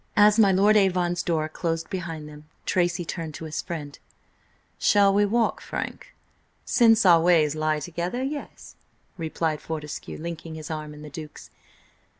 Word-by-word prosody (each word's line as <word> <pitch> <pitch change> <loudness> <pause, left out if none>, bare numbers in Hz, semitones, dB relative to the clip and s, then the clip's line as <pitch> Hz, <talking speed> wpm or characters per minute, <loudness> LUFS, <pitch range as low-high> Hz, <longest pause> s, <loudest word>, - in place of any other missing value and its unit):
As 210 +1 +6
my 200 -3 +6
Lord 200 +3 +4
Avon's 180 -3 +2
door 160 -2 0
closed 165 0 -3
behind 165 -5 -5
them, 150 0 -12 0.2
Tracy 175 -1 0
turned 160 -2 -5
to 160 - -7
his 155 0 -3
friend: 150 -5 -7 0.8
"Shall 200 -1 +4
we 205 +1 +4
walk, 230 +2 +1
Frank?" - - -6 0.5
"Since 225 -3 +4
our 170 -3 +7
ways 160 -3 +3
lie 155 0 0
together, 175 +9 -3
yes," 285 +2 -6 0.4
replied 160 -2 -2
Fortescue, 150 -2 -6
linking 165 0 -6
his 155 0 -7
arm 155 -1 -5
in 150 - -11
the 150 - -10
Duke's. 155 0 -10
170 Hz, 155 wpm, -25 LUFS, 155-195 Hz, 0.8 s, our